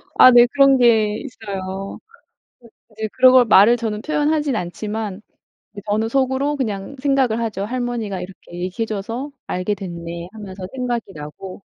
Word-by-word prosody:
아 255 - +8
네. 240 0 +8
그런 275 -1 +5
게 220 -4 +3
있어요. 195 -6 -6 0.9
그 215 - -24
이제 220 0 -3
그런 255 0 +6
걸 255 -1 +7
말을 215 +3 +6
저는 215 -2 -3
표현하진 300 -2 0
않지만 210 +2 -4 0.5
이제 205 - -9
저는 215 +2 0
속으로 270 +3 0
그냥 215 0 -4
생각을 265 -5 +1
하죠. 210 -4 -3
'할머니가 240 -5 -3
이렇게 180 -1 -10
얘기해 185 +5 -3
줘서 225 +7 -5 0.2
알게 185 +3 -2
됐네.' 170 -2 -7
하면서 195 -3 -8
생각이 240 -5 -3
나고 155 +6 -9
220 Hz, 320 characters per minute, -20 LUFS, 195-255 Hz, 0.9 s, 아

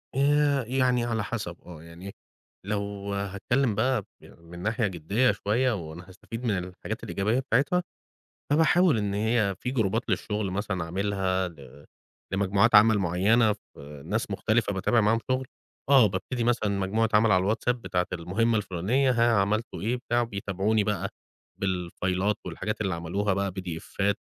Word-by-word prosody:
آآ 145 0 +3
يعني 125 -1 +1
على 115 -3 -1
حسب، 100 -7 -4
آه 80 -3 -11
يعني 85 +4 -10 0.5
لو 100 -1 -3
هاتكلّم 100 +5 0
بقى 120 +1 +1 0.2
ب - - -16
من 85 +1 -12
ناحية 110 +3 0
جديّة 100 +8 +1
شوية، 120 +5 0
وأنا 85 -2 -6
هستفيد 115 +5 -9
من 105 -4 +1
الحاجات 90 0 -6
الإيجابية 110 +6 0
بتاعتها، 140 +7 +1 0.7
فباحاول 160 -1 +4
إن 100 -1 -1
هي 105 -1 +1
في 125 - -3
جروبات 115 -3 0
للشغل 105 -2 -1
مثلًا، 95 -2 -2
اعملها 95 0 -1
ل 70 -3 -15 0.5
لمجموعات 100 +3 +2
عَمل 110 0 +7
معيّنة، 100 +6 +3
في 75 -8 -12
ناس - - -2
مختلفة، 110 -1 +1
بتابع 100 +5 +2
معاهم 110 +2 +3
شُغل، 130 0 0 0.4
آه 135 -5 +7
بابتدي 115 +6 -3
مثلًا 115 -3 +1
مجموعة 105 +4 +1
عَمل 105 0 +5
على 95 +3 +3
الWhatsApp، 125 - 0
بتاعة 90 -6 -2
المهمة 100 +7 0
الفُلانية، 105 +8 0
ها 120 -1 +3
عملتوا 110 +4 -1
إيه، 115 +4 0
بتاع، 120 -1 -1
وبيتابعوني 100 -1 0
بقى 100 -2 -1 0.5
بالفايلات، 95 +1 -1
والحاجات 95 +5 -4
اللي 95 -4 0
عملوها 95 +4 -1
بقى، 100 0 -1
بي 95 +1 -6
دي 90 -3 -5
إفّات، 100 +4 -1
105 Hz, 155 wpm, -27 LUFS, 95-115 Hz, 0.7 s, عَمل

